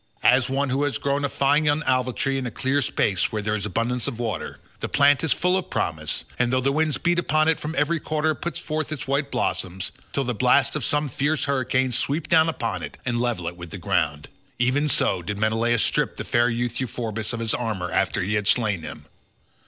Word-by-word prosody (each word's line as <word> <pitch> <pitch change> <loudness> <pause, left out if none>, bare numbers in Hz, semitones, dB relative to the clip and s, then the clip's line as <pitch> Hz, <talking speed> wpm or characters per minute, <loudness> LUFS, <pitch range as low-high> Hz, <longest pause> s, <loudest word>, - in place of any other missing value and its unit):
As 125 +1 +4
one 135 0 0
who 135 +2 +1
has 145 - 0
grown 140 0 -1
a 140 - +1
fine 145 +3 +2
young 150 +2 +2
olive 130 -2 +1
tree 135 0 0
in 130 - -3
a - - -2
clear 135 +4 0
space 95 -7 0
where 105 -1 -2
there 105 +1 0
is 105 -1 -2
abundance 120 +2 -1
of 115 - -4
water—the 115 -5 -5
plant 145 0 +4
is 160 - +1
full 180 +1 +2
of 190 - -2
promise, 80 -1 -2
and 125 -1 +2
though 130 - +2
the 135 +2 +1
winds 155 +1 +1
beat 175 0 +1
upon 155 -2 +2
it 160 - +2
from 155 +2 -5
every 170 -1 +2
quarter 155 +1 0
it 150 - -4
puts 170 - -3
forth 155 -1 -3
its 145 -1 -5
white 140 +1 0
blossoms 95 -7 -2 0.2
till 140 - 0
the 125 -1 -2
blasts 105 - +3
of - - -2
some 145 0 +1
fierce 145 +4 0
hurricane 130 -1 +1
sweep 145 +6 -1
down 160 0 +5
upon 115 - -2
it - - -7
and 120 -2 0
level 115 -9 -1
it 85 - -4
with 85 -1 -9
the 100 - -7
ground—even 95 - -1
so 95 -9 +2
did 105 +4 -4
Menelaus 110 +2 +2
strip - - 0
the - - -3
fair 120 0 +2
youth 120 0 -1
Euphorbus 115 -4 -3
of 120 - -4
his 115 -1 0
armour 105 -7 -2
after - - +1
he 100 +4 -1
had 105 -1 0
slain 105 -7 +2
him. 75 -3 -9
125 Hz, 225 wpm, -24 LUFS, 110-145 Hz, 0.2 s, down